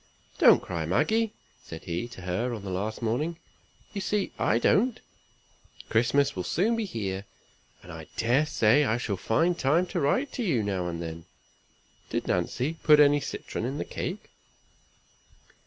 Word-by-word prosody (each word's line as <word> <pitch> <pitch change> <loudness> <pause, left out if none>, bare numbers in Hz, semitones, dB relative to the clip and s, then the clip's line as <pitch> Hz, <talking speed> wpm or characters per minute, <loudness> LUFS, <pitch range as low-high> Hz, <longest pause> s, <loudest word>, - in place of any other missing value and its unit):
"Don't - - +7
cry, 85 -3 -3
Maggie!" 220 - +2 0.3
said 80 - -9
he 85 +7 -3
to 120 -5 -11
her 95 +8 -2
on 105 - -8
the 95 - -5
last 105 +5 -3
morning; 150 +9 -1 0.6
"you 200 - -3
see 205 +1 -1
I 110 - +2
don't. 220 - +2 0.9
Christmas 140 +5 +2
will 90 - -3
soon 210 - +1
be 225 -1 -1
here, 100 - -4 0.6
and - - -11
I - - -9
dare 130 +6 +2
say 115 +3 +4
I 115 -4 +1
shall 110 -4 -2
find 165 - +1
time 155 +7 +3
to 175 - 0
write 250 - +1
to 250 - -2
you 135 - +1
now 95 -3 -2
and 85 0 -4
then. 80 0 -7 0.8
Did - - -2
Nancy 130 - -1
put 150 -1 +6
any 145 0 +6
citron 140 - -5
in 135 +4 -3
the - - -3
cake?" 190 +4 -5
125 Hz, 165 wpm, -27 LUFS, -, 0.9 s, Don't